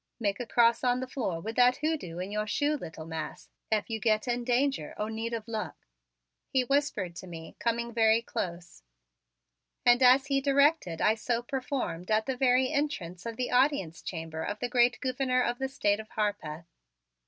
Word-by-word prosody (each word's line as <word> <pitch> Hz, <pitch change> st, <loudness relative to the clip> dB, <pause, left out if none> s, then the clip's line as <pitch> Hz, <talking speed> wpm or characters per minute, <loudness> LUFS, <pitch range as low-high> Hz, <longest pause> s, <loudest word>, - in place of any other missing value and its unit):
"Make 200 Hz, -3 st, -1 dB
a 245 Hz, -, -4 dB
cross 235 Hz, 0 st, +3 dB
on 250 Hz, 0 st, +2 dB
the 260 Hz, -, -3 dB
floor 225 Hz, -10 st, -3 dB
with 225 Hz, +5 st, -5 dB
that 250 Hz, +1 st, +5 dB
hoodoo 290 Hz, -, -2 dB
in 185 Hz, +3 st, -4 dB
your 210 Hz, 0 st, -2 dB
shoe, 290 Hz, +7 st, +1 dB
little 165 Hz, -, -8 dB
mas', 160 Hz, -1 st, -6 dB, 0.2 s
ef 215 Hz, -2 st, +1 dB
you 225 Hz, -1 st, -3 dB
git 215 Hz, +1 st, +1 dB
in 240 Hz, 0 st, 0 dB
danger 250 Hz, -, 0 dB
or 210 Hz, +1 st, -2 dB
need 225 Hz, +1 st, -3 dB
of 230 Hz, -1 st, -4 dB
luck," 220 Hz, -2 st, -5 dB, 0.6 s
he 260 Hz, -1 st, +1 dB
whispered 250 Hz, -10 st, 0 dB
to 185 Hz, -, -8 dB
me, 165 Hz, -2 st, -9 dB
coming 235 Hz, 0 st, -1 dB
very 225 Hz, 0 st, +4 dB
close. 175 Hz, -, -5 dB, 1.0 s
And 245 Hz, +1 st, +6 dB
as 260 Hz, +2 st, +6 dB
he 275 Hz, -1 st, +1 dB
directed 280 Hz, -, +2 dB
I 215 Hz, -, +5 dB
so 235 Hz, +2 st, -2 dB
performed 250 Hz, -, -3 dB
at 220 Hz, 0 st, +2 dB
the 265 Hz, -, -2 dB
very 255 Hz, 0 st, +3 dB
entrance 200 Hz, -, -2 dB
of 230 Hz, -1 st, -5 dB
the 250 Hz, -, -2 dB
audience 250 Hz, -, +2 dB
chamber 160 Hz, -2 st, -5 dB
of 205 Hz, +5 st, -3 dB
the 245 Hz, +2 st, -3 dB
great 245 Hz, 0 st, +3 dB
Gouverneur 255 Hz, -1 st, +1 dB
of 240 Hz, 0 st, -1 dB
the 265 Hz, 0 st, -1 dB
State 210 Hz, -7 st, +1 dB
of 220 Hz, 0 st, -9 dB
Harpeth. 175 Hz, -7 st, -3 dB
235 Hz, 190 wpm, -29 LUFS, 205-255 Hz, 1.0 s, And